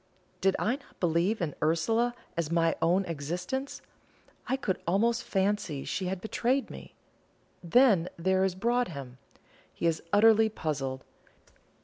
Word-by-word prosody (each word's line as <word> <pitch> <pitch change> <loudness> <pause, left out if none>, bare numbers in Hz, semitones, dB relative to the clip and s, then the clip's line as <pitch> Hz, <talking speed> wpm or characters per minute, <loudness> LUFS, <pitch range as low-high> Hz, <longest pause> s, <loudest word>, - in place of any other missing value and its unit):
Did 195 0 +3
I 240 +5 0
not 285 - -23
believe 175 +5 +1
in 150 -4 -2
Ursula 225 +10 +1 0.2
as 170 -2 -1
in 170 - -1
my 165 -1 +2
own 185 +3 +3
existence, 180 - -4 0.6
I 265 - 0
could 200 -9 -2
almost 230 +7 +2
fancy 190 -7 -1
she 185 - -2
had 185 0 -3
betrayed 250 +4 0
me. - - -11 0.7
Then 190 -2 +4
there 190 +2 +2
is 190 -2 0
Broadhem. 185 - -2 0.5
He - - -5
is 165 -2 +1
utterly 220 +1 +5
puzzled. 135 -9 -3
190 Hz, 135 wpm, -29 LUFS, 165-225 Hz, 0.7 s, utterly